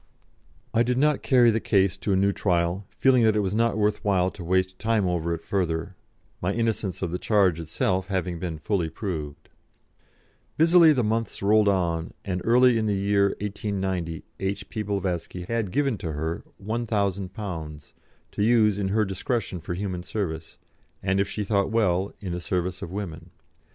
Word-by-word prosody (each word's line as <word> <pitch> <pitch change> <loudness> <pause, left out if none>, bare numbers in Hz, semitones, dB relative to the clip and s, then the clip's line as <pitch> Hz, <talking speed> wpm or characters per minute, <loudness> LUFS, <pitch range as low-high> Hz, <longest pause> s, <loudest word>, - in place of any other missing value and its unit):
I 115 - +3
did 125 +1 +1
not 150 +1 +2
carry 120 -3 +5
the 110 - +1
case 95 -4 +2
to 105 - -2
a - - +3
new 100 +1 +3
trial, 90 0 0
feeling 130 -2 +3
that 110 -2 +4
it 105 - +2
was 95 -1 -1
not 115 -1 +1
worth 105 0 +1
while 95 -3 +2
to 90 - -9
waste 95 +2 0
time 110 -3 +1
over 85 -1 -1
it 85 -1 -3
further, 90 -1 -2 0.5
my 90 +3 0
innocence 110 -5 -1
of 85 - -2
the 90 - -2
charge 95 -6 +2
itself 90 +3 -1
having 90 -3 -2
been 80 -2 -4
fully 85 0 -1
proved. 80 -8 -5 1.1
Busily 165 0 +7
the 130 -5 +2
months 110 -1 -2
rolled 105 +1 +4
on, 85 -4 0
and 90 -2 -2
early 125 0 +5
in 110 - 0
the 105 - +1
year 100 0 +2
1890 95 -5 -3 0.2
H.P.Blavatsky 95 -3 -3
had 115 -1 -1
given 135 -1 0
to 80 -3 -4
her 80 +3 -3 0.2
£1,000, 100 -8 -3 0.4
to 105 - -1
use 110 -3 +4
in 100 - 0
her 105 +2 +2
discretion 95 0 -2
for 85 - -4
human 95 -2 -3
service, 85 -5 -4 0.5
and 95 0 +1
if 100 - +1
she 105 - -3
thought 100 -1 +1
well, 100 -4 +1
in 95 -3 -5
the 90 0 -3
service 90 +1 -2
of - - -5
women. 90 -3 -6
100 Hz, 170 wpm, -25 LUFS, 90-110 Hz, 1.1 s, Busily